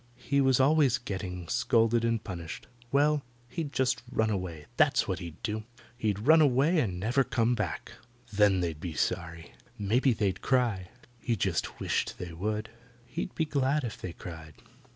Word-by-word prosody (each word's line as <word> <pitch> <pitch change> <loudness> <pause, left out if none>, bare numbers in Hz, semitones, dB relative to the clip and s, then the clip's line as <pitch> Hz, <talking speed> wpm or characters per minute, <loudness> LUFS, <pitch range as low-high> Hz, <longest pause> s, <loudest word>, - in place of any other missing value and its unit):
He 140 +2 +1
was 130 -1 +4
always 135 -2 +4
getting 95 -6 -5
scolded 115 0 +2
and 115 -1 0
punished. 85 -5 -6 0.3
Well, 145 +1 +3 0.3
he'd 150 +3 -4
just 130 -2 +1
run 110 -3 +1
away. 90 -6 -4
That's - - +3
what - - -2
he'd 85 -3 -8
do. 110 -1 -2 0.3
He'd 110 -5 -1
run 160 +2 +7
away 145 +4 +4
and 95 -10 -1
never 120 +7 +2
come 115 0 +1
back. - - -3 0.4
Then 100 -2 +4
they'd 80 -3 -2
be 85 -1 -5
sorry. 85 +1 -2 0.3
Maybe 120 +6 +2
they'd 100 -4 0
cry. 115 -9 +1 0.3
He 115 0 0
just 95 -4 -1
wished - - -1
they 90 -2 -6
would. 105 +5 -3 0.3
He'd 165 +8 -5
be 160 - +1
glad 140 0 +1
if 115 -4 -5
they 90 - -4
cried. 80 -4 -9
115 Hz, 165 wpm, -29 LUFS, 90-130 Hz, 0.4 s, run